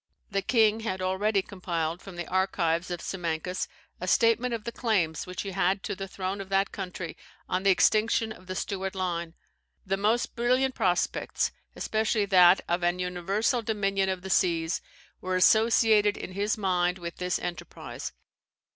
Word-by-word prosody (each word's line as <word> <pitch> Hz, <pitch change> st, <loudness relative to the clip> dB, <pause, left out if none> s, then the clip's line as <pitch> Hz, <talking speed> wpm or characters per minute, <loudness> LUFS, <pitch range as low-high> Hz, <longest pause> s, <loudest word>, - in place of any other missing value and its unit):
The 195 Hz, -1 st, +1 dB
king 220 Hz, +1 st, +3 dB
had 205 Hz, -4 st, -3 dB
already 190 Hz, +2 st, +1 dB
compiled, 170 Hz, -3 st, -3 dB
from 195 Hz, -3 st, -10 dB
the 175 Hz, -1 st, -5 dB
archives 180 Hz, -2 st, 0 dB
of 175 Hz, -1 st, -4 dB
Simancas, 180 Hz, 0 st, -3 dB, 0.3 s
a -, -, -5 dB
statement 235 Hz, +1 st, +3 dB
of 230 Hz, -2 st, -3 dB
the 235 Hz, -, -4 dB
claims 190 Hz, -11 st, 0 dB
which 180 Hz, 0 st, -4 dB
he 200 Hz, -, -5 dB
had 195 Hz, +1 st, +1 dB
to -, -, -3 dB
the 195 Hz, +1 st, -6 dB
throne 190 Hz, +1 st, -4 dB
of 195 Hz, -, -9 dB
that 195 Hz, 0 st, +1 dB
country 180 Hz, -4 st, -6 dB, 0.3 s
on 185 Hz, -, 0 dB
the 195 Hz, -, +3 dB
extinction 220 Hz, +3 st, +3 dB
of 185 Hz, -4 st, -12 dB
the 185 Hz, -, -4 dB
Stuart 190 Hz, 0 st, -3 dB
line; 170 Hz, -3 st, -3 dB, 0.5 s
the 195 Hz, 0 st, 0 dB
most 215 Hz, +4 st, +1 dB
brilliant 255 Hz, +2 st, +2 dB
prospects, 185 Hz, -7 st, 0 dB, 0.2 s
especially 215 Hz, -1 st, 0 dB
that 185 Hz, -2 st, +6 dB
of 175 Hz, +1 st, 0 dB
an 175 Hz, +1 st, +1 dB
universal 190 Hz, +7 st, 0 dB
dominion 195 Hz, -3 st, 0 dB
of 185 Hz, -1 st, -3 dB
the 190 Hz, -, -4 dB
seas, 170 Hz, -2 st, +1 dB, 0.4 s
were 185 Hz, 0 st, -2 dB
associated 220 Hz, +1 st, +4 dB
in -, -, -6 dB
his 205 Hz, +3 st, -1 dB
mind 180 Hz, -3 st, +1 dB
with 170 Hz, -1 st, -7 dB
this 180 Hz, 0 st, -1 dB
enterprise. 175 Hz, -2 st, -6 dB
190 Hz, 165 wpm, -28 LUFS, 180-210 Hz, 0.5 s, that